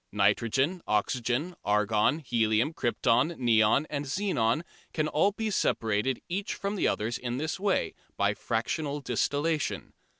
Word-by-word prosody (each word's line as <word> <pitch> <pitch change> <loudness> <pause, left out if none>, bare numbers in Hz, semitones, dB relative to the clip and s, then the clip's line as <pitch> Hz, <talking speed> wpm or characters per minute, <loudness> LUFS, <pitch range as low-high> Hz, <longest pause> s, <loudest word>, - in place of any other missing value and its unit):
Nitrogen, 115 - +1
oxygen, 120 - 0
argon, 105 +6 +2
helium, 115 -1 +1
krypton, 125 +4 +1
neon 115 +2 +3
and 145 -1 -3
xenon 145 - 0 0.3
can 155 -1 0
all 160 +6 +2
be 215 +1 -3
separated 115 - 0
each 195 +3 -3
from 200 +1 -3
the 195 - +1
others 115 +3 -1
in 120 0 -3
this 155 +5 -3
way, 200 0 0 0.2
by - - +2
"fractional 140 +6 -2
distillation." 145 +5 -1
130 Hz, 130 wpm, -28 LUFS, 115-160 Hz, 0.3 s, neon